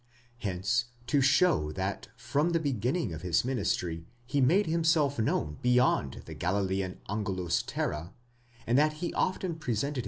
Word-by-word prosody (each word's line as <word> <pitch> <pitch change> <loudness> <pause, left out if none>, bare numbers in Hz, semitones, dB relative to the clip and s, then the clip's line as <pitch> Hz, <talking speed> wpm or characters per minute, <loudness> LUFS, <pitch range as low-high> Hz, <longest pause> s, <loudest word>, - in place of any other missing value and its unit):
Hence, 105 +4 0 0.2
to 140 +3 +2
show 140 - +3
that 95 +2 -3
from 145 +8 0
the 165 - +3
beginning 135 - -1
of 80 - -6
his 85 +3 +1
ministry 90 -9 -1 0.2
he 140 +3 0
made 175 +11 +4
himself 160 -4 +2
known 75 -8 0
beyond 125 - +2
the - - -8
Galilean 95 0 -1
angu/us 95 -4 -1
terre, 80 +4 -3 0.5
and 120 +4 +3
that 155 +1 +3
he 170 +3 -4
often 185 -3 -1
presented. 140 -1 -2
120 Hz, 145 wpm, -29 LUFS, 95-150 Hz, 0.5 s, made